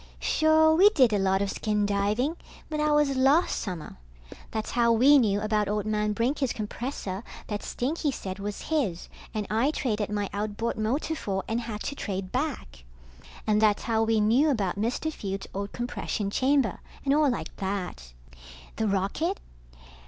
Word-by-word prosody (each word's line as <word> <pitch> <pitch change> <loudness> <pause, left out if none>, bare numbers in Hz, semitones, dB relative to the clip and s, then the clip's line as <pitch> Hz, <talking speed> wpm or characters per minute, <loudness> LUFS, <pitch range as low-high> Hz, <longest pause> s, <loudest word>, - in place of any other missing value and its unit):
Sure, 315 0 +4
we 380 +6 +7
did 260 - +4
a 205 - +2
lot 190 0 +2
of 200 - -2
skin 210 -2 0
diving, 205 +9 0 0.4
but 305 - -1
that 300 0 +1
was 295 -2 +3
last 275 +6 +3
summer. 180 -6 -6 0.5
That's 220 -1 -3
how 235 -1 +3
we 270 +6 +6
knew 205 -5 +2
about 215 -1 +1
old 210 0 -1
man 210 0 0
Brinker's 255 +4 0
compressor 215 -2 -4 0.2
that 210 -1 -4
Stinky 295 +4 -2
said 190 -6 -6
was 205 +1 -5
his 240 - -1 0.2
and 215 -2 -3
I 230 +6 +2
traded 220 -9 -1
my 205 -1 -1
outboard 210 +3 -2
motor 245 +9 -1
for 195 -10 -3
and 225 +2 -1
had 220 -3 -5
to - - -3
trade 195 -7 -4
back. 250 - -3 0.6
And 215 -1 +2
that's 210 -2 +3
how 225 -1 +1
we 225 0 +2
knew 235 +9 +4
about 205 -10 0
Mr. 240 +9 -1
Fields' 195 -4 -4
old 200 +1 -4
compression 230 -4 -3
chamber, 260 -3 +2 0.3
and 275 - +3
all 300 -1 +4
like 245 - -4
that. 190 - -4 0.6
The 220 - 0
rocket? 200 - 0
220 Hz, 165 wpm, -27 LUFS, 205-275 Hz, 0.6 s, we